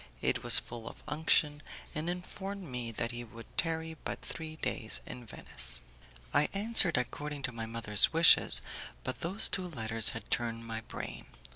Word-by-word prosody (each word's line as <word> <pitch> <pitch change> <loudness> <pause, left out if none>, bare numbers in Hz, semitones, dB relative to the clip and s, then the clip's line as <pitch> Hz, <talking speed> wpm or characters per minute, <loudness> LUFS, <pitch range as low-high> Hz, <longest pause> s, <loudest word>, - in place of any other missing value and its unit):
It - - -1
was - - +8
full 115 -1 -4
of - - -15
unction, 150 -1 +1 0.3
and 155 +3 -4
informed 190 +2 -6
me 125 -7 -6
that 115 +1 -4
he 120 0 -7
would 115 0 -12
tarry 160 -1 -2
but - - -5
three 160 -1 -7
days 110 -7 -2
in 125 -2 -10
Venice. - - -8 0.5
I 150 - +2
answered 200 - +4
according 145 +3 -4
to 125 - -2
my 115 -1 -6
mother's 110 -3 +6
wishes, 165 +1 +6 0.4
but - - -5
those 190 +5 +3
two 185 -2 -2
letters 115 - +1
had - - -11
turned 115 -1 -2
my 110 -1 -5
brain. - - -8
135 Hz, 165 wpm, -31 LUFS, 115-165 Hz, 0.5 s, was